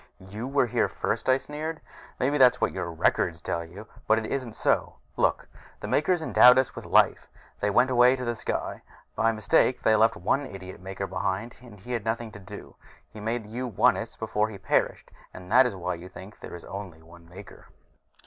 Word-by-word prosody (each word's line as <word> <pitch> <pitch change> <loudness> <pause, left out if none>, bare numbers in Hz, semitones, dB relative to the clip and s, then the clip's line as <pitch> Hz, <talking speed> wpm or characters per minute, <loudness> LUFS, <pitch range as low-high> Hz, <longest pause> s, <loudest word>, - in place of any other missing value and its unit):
"You 105 +6 -7
were 140 -1 +2
here 120 - +1
first!" - - -3
I 130 - +5
sneered. 155 +3 -6 0.4
"Maybe 145 +3 +1
that's 125 -1 +6
what - - +1
your 90 -2 -4
records 80 +1 +1
tell 85 0 -3
you, 90 +6 -11 0.2
but 110 - +4
it 110 - -2
isn't 125 -2 -3
so. - - 0 0.2
Look: - - +1 0.3
the - - -6
Makers 160 +2 +1
endowed 125 -4 +7
us 130 -1 +1
with - - -8
life, - - +3 0.3
then 100 -1 -1
went 125 +2 +4
away 125 0 +6
in - - -2
to 125 - -5
the 120 - -1
sky. 115 - -4 0.3
By 115 0 +2
mistake 110 +3 +2
they 110 - +4
left 110 +1 +4
one 135 +10 0
idiot 95 -2 -10
Maker 95 +1 -5
behind, 95 +4 -3
and 115 -5 -14
he 120 +6 -10
had 115 -4 -2
nothing 115 0 -3
to 105 - -11
do. 95 - -11 0.4
He 110 - -9
made 115 +1 -3
you 120 +4 -5
Onists 110 - +1
before 110 -1 -1
he 105 - -8
perished, 95 - -1 0.2
and 90 +1 -11
that 130 +2 +6
is 115 - -5
why 90 -1 -3
you 90 +2 -9
think 95 +2 -12
there - - -9
is 85 - -10
only 95 -5 -8
one 85 0 -17
Maker." 95 +4 -13
110 Hz, 205 wpm, -26 LUFS, 95-125 Hz, 0.4 s, endowed